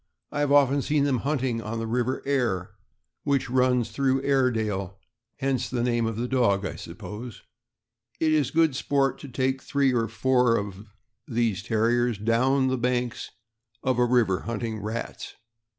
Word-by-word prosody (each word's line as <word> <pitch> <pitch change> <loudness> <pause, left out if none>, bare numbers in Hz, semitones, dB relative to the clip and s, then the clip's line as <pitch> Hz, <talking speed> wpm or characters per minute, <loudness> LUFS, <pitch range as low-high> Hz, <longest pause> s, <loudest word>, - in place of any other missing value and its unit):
I 145 - -3
have 145 -1 +1
often 140 -1 +4
seen 150 0 +1
them 135 -3 +1
hunting 130 -4 -1
on 115 +1 -4
the 115 - -3
River 125 +3 -1
Aire, 120 -10 0 0.5
which 140 -4 0
runs 125 -3 +2
through 135 +2 +1
Airedale; 110 -9 0 0.4
hence 130 -2 -1
the 120 -2 -1
name 120 -2 +1
of 115 - -3
the 120 +3 -2
dog, 110 -7 +2
I - - -4
suppose. 110 +3 -8 0.8
It 160 -1 +2
is 150 -4 +2
good 160 -2 +2
sport 135 -1 0
to 145 - -9
take 130 +1 -1
three 140 -2 +1
or 115 -2 +1
four 125 +1 +2
of 100 +1 -6 0.4
these 115 -5 0
Terriers 115 +1 +1
down 125 +5 +2
the 130 -1 0
banks 125 -1 -1 0.5
of 130 -2 +1
a 125 - +5
river 120 -7 +2
hunting 115 -1 -4
rats. 110 +3 -5
125 Hz, 160 wpm, -26 LUFS, 115-135 Hz, 0.8 s, a